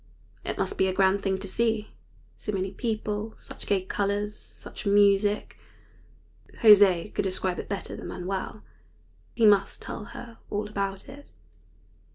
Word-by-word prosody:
It -, -, -3 dB
must -, -, -2 dB
be 190 Hz, -, +4 dB
a 185 Hz, -, 0 dB
grand 195 Hz, +1 st, +3 dB
thing 190 Hz, -1 st, 0 dB
to 195 Hz, +1 st, -5 dB
see 220 Hz, +1 st, 0 dB, 0.4 s
so 210 Hz, -, -4 dB
many 190 Hz, -1 st, -2 dB
people, 215 Hz, 0 st, -3 dB
such -, -, -10 dB
gay 195 Hz, -2 st, +2 dB
colors, 205 Hz, +2 st, -1 dB
such -, -, -9 dB
music. 205 Hz, +1 st, +3 dB, 1.1 s
José 205 Hz, -4 st, +7 dB
could -, -, +1 dB
describe 190 Hz, -1 st, -1 dB
it -, -, -6 dB
better 200 Hz, -1 st, -4 dB
than -, -, -7 dB
Manuel. 190 Hz, +3 st, -4 dB, 0.7 s
He 230 Hz, -, +4 dB
must 200 Hz, -2 st, +4 dB
tell 210 Hz, -, -6 dB
her 230 Hz, +2 st, -10 dB
all 210 Hz, +1 st, -2 dB
about 195 Hz, -2 st, -3 dB
it. 285 Hz, +2 st, -13 dB
200 Hz, 150 wpm, -27 LUFS, 190-210 Hz, 1.1 s, José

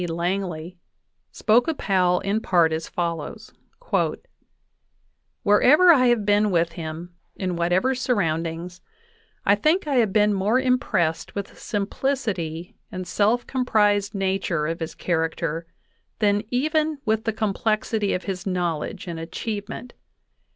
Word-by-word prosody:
Langley, 175 Hz, 0 st, -3 dB, 0.5 s
spoke 235 Hz, +3 st, +3 dB
of 320 Hz, -3 st, -1 dB
Powell 180 Hz, -2 st, +2 dB
in 205 Hz, +3 st, 0 dB
part 170 Hz, -6 st, +3 dB
as 160 Hz, +1 st, -4 dB
follows: 170 Hz, -3 st, -4 dB, 1.9 s
"Wherever 275 Hz, -, +6 dB
I 255 Hz, -4 st, +4 dB
have 235 Hz, -4 st, +2 dB
been 205 Hz, +1 st, +3 dB
with 170 Hz, -2 st, +1 dB
him, 165 Hz, +1 st, -7 dB, 0.2 s
in 185 Hz, -2 st, -2 dB
whatever 175 Hz, +9 st, +2 dB
surroundings, 175 Hz, -7 st, -2 dB, 0.6 s
I 200 Hz, -, +5 dB
think 310 Hz, -, +2 dB
I 285 Hz, -3 st, 0 dB
have 225 Hz, -5 st, +3 dB
been 210 Hz, 0 st, +3 dB
more 205 Hz, +6 st, +2 dB
impressed 250 Hz, -, 0 dB
with 200 Hz, -1 st, -4 dB
the -, -, -19 dB
simplicity 200 Hz, -, -3 dB, 0.2 s
and 185 Hz, -2 st, -5 dB
self 220 Hz, +6 st, +1 dB
comprised 210 Hz, -5 st, +1 dB
nature 190 Hz, -5 st, 0 dB
of 165 Hz, +2 st, -3 dB
his 160 Hz, -1 st, -5 dB
character 165 Hz, -1 st, -2 dB, 0.5 s
than 205 Hz, 0 st, +1 dB
even 310 Hz, +4 st, +1 dB
with 220 Hz, 0 st, 0 dB
the 225 Hz, -, +1 dB
complexity 215 Hz, 0 st, 0 dB
of 180 Hz, -, -4 dB
his 190 Hz, 0 st, -5 dB
knowledge 180 Hz, +1 st, -2 dB
and 170 Hz, -2 st, -5 dB
achievement. 205 Hz, +7 st, -5 dB
195 Hz, 130 wpm, -24 LUFS, 170-225 Hz, 1.9 s, Wherever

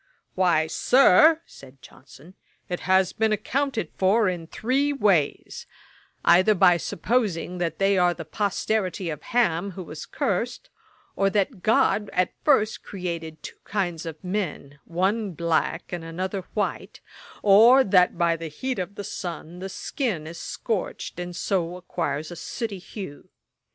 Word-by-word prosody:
'Why, 175 Hz, -4 st, +3 dB
Sir, 270 Hz, -, +5 dB
said 135 Hz, 0 st, -15 dB
(Johnson,) 140 Hz, +7 st, -16 dB, 0.3 s
it 180 Hz, -, -3 dB
has 190 Hz, 0 st, +2 dB
been 220 Hz, 0 st, +1 dB
accounted 230 Hz, -, -1 dB
for 205 Hz, +3 st, +3 dB
in 175 Hz, -3 st, -3 dB
three 270 Hz, -, 0 dB
ways: 195 Hz, -, 0 dB, 0.6 s
either 185 Hz, +5 st, +5 dB
by 180 Hz, -2 st, +5 dB
supposing 180 Hz, -2 st, -1 dB
that 165 Hz, -2 st, -2 dB
they 195 Hz, -1 st, +3 dB
are 175 Hz, -1 st, +3 dB
the 165 Hz, -, -7 dB
posterity 195 Hz, -1 st, -1 dB
of 150 Hz, -, -7 dB
Ham, 200 Hz, -6 st, 0 dB
who 185 Hz, -, -7 dB
was 155 Hz, -2 st, -9 dB
cursed; 230 Hz, +6 st, -2 dB, 0.4 s
or 195 Hz, 0 st, +2 dB
that 200 Hz, 0 st, -1 dB
GOD 215 Hz, -3 st, +2 dB
at 180 Hz, 0 st, +1 dB
first 220 Hz, -8 st, +3 dB
created 170 Hz, -4 st, -6 dB
two -, -, -9 dB
kinds 175 Hz, -5 st, -2 dB
of 160 Hz, -1 st, -8 dB
men, 180 Hz, -7 st, -4 dB
one 190 Hz, +4 st, -1 dB
black 170 Hz, +1 st, -1 dB
and 175 Hz, -2 st, -4 dB
another 185 Hz, +3 st, -4 dB
white; 210 Hz, -, -3 dB, 0.4 s
or 225 Hz, +6 st, +7 dB
that 185 Hz, -4 st, +3 dB
by 170 Hz, -1 st, +2 dB
the 165 Hz, 0 st, -6 dB
heat 255 Hz, -, -4 dB
of 185 Hz, +2 st, -4 dB
the 205 Hz, -, -6 dB
sun 175 Hz, -2 st, -6 dB
the 190 Hz, +1 st, -5 dB
skin 200 Hz, -, -3 dB
is 165 Hz, +2 st, -8 dB
scorched, 210 Hz, -5 st, -4 dB
and 175 Hz, 0 st, -5 dB
so 175 Hz, -1 st, -1 dB
acquires 160 Hz, -3 st, -3 dB
a -, -, -6 dB
sooty 205 Hz, +3 st, -5 dB
hue. 180 Hz, -5 st, -9 dB
185 Hz, 145 wpm, -25 LUFS, 170-210 Hz, 0.6 s, or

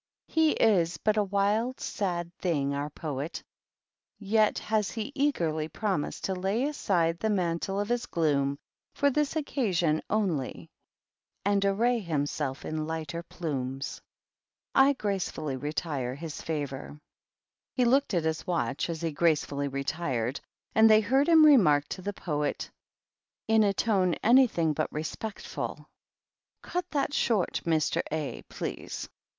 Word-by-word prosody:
He 320 Hz, -1 st, +3 dB
is 180 Hz, -6 st, +3 dB
but 215 Hz, -1 st, +1 dB
a 210 Hz, -, +3 dB
wild, 205 Hz, +5 st, 0 dB
sad 175 Hz, -4 st, -3 dB
thing, 145 Hz, -6 st, 0 dB
our 145 Hz, +1 st, -2 dB
Poet, 150 Hz, 0 st, -5 dB, 0.8 s
j 215 Hz, +1 st, +3 dB
has 215 Hz, -2 st, 0 dB
he 225 Hz, +3 st, -4 dB
eagerly 170 Hz, -, 0 dB
promised 190 Hz, -2 st, -2 dB
to 190 Hz, -, 0 dB
lay 195 Hz, +6 st, 0 dB
aside 175 Hz, -, 0 dB
the 220 Hz, -, 0 dB
man1 190 Hz, -1 st, 0 dB
of 205 Hz, +2 st, -2 dB
his 240 Hz, 0 st, 0 dB
gloom 140 Hz, -4 st, +1 dB, 0.4 s
for 285 Hz, 0 st, +3 dB
this 300 Hz, +2 st, 0 dB
occasion 185 Hz, -, +1 dB
only 155 Hz, -, -1 dB, 0.7 s
and 200 Hz, 0 st, +2 dB
arr 230 Hz, +5 st, +2 dB
himself 145 Hz, -6 st, -2 dB
in 155 Hz, 0 st, -3 dB
lighter 160 Hz, 0 st, -4 dB
plumes. 135 Hz, -6 st, -4 dB, 0.7 s
I 275 Hz, +1 st, +6 dB
gracefully 190 Hz, -, -2 dB
retire 140 Hz, -2 st, -3 dB
his 155 Hz, +1 st, -7 dB
favor." 145 Hz, -2 st, -4 dB, 0.8 s
He 250 Hz, -, +3 dB
looked 260 Hz, -3 st, +3 dB
at 170 Hz, -, +1 dB
his 160 Hz, +3 st, -2 dB
watch 155 Hz, -4 st, -1 dB
as 165 Hz, -1 st, -4 dB
he 165 Hz, -1 st, -1 dB
gracefully 150 Hz, -2 st, +1 dB
retire 135 Hz, -3 st, -2 dB, 0.4 s
and 220 Hz, 0 st, +6 dB
they 215 Hz, 0 st, +7 dB
heard 265 Hz, +8 st, +2 dB
him 320 Hz, -2 st, +8 dB
remark 150 Hz, -, +6 dB
to 185 Hz, -, -5 dB
the 200 Hz, +2 st, -3 dB
Poet, 150 Hz, -6 st, -2 dB, 0.8 s
in 220 Hz, 0 st, +5 dB
a 200 Hz, -, +3 dB
to 190 Hz, -6 st, +2 dB
anything 225 Hz, -10 st, +4 dB
but 155 Hz, +1 st, -2 dB
respectful, 180 Hz, +7 st, -5 dB, 0.4 s
" -, -, -62 dB
Cut 360 Hz, 0 st, -3 dB
that 285 Hz, -1 st, -1 dB
short, 220 Hz, -, +1 dB
Mr. 160 Hz, -2 st, +2 dB
A 155 Hz, -2 st, -3 dB
please." -, -, -5 dB
175 Hz, 135 wpm, -28 LUFS, 150-220 Hz, 0.8 s, him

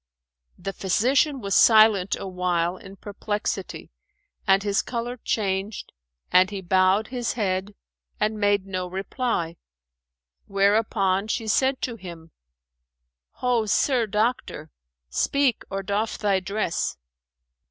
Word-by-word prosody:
The 195 Hz, -, -5 dB
physician 255 Hz, -, +1 dB
was 200 Hz, -2 st, -2 dB
silent 215 Hz, -4 st, +6 dB
awhile 180 Hz, -2 st, -1 dB
in 195 Hz, +1 st, -12 dB
perplexity 205 Hz, -1 st, -4 dB, 0.6 s
and 195 Hz, 0 st, +4 dB
his 200 Hz, -1 st, +1 dB
colour 240 Hz, 0 st, -4 dB
changed 200 Hz, -2 st, -2 dB, 0.4 s
and 185 Hz, +1 st, +5 dB
he 200 Hz, -1 st, -5 dB
bowed 190 Hz, +3 st, +2 dB
his 245 Hz, -2 st, -2 dB
head 195 Hz, -2 st, -2 dB, 0.4 s
and 215 Hz, 0 st, 0 dB
made 205 Hz, -1 st, +2 dB
no 185 Hz, -2 st, -3 dB
reply; 190 Hz, -2 st, -3 dB, 0.9 s
whereupon 200 Hz, -1 st, +2 dB
she 225 Hz, +1 st, -2 dB
said 265 Hz, +5 st, +1 dB
to 235 Hz, -2 st, -3 dB
him, 170 Hz, -4 st, -10 dB, 1.1 s
"Ho, 240 Hz, -3 st, +2 dB
sir 245 Hz, +1 st, +2 dB
doctor, 210 Hz, -7 st, -2 dB, 0.4 s
speak 275 Hz, -, +1 dB
or 195 Hz, 0 st, -3 dB
doff 210 Hz, +3 st, -1 dB
thy 200 Hz, -2 st, +1 dB
dress." 190 Hz, -, -2 dB
200 Hz, 110 wpm, -24 LUFS, 190-225 Hz, 1.1 s, silent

